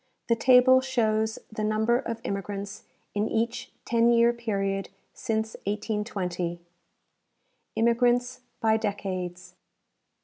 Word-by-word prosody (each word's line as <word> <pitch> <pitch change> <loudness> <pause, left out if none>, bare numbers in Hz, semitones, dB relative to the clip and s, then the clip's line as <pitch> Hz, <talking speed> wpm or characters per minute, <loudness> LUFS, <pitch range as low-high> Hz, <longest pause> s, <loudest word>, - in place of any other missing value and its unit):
The 230 - +5
table 255 +2 +6
shows 220 -4 0
the 215 0 -4
number 220 +3 +2
of 230 -3 -5
immigrants 200 +1 -5 0.3
in 210 +1 0
each 230 +2 -2
ten 235 0 +3
year 235 0 +5
period 195 -4 -2 0.2
since 220 -2 -2
1820: 200 -5 -2 1.2
Immigrants 245 +2 +2 0.2
by 220 -1 +3
Decades. 185 -4 -4
220 Hz, 100 wpm, -27 LUFS, 200-235 Hz, 1.2 s, table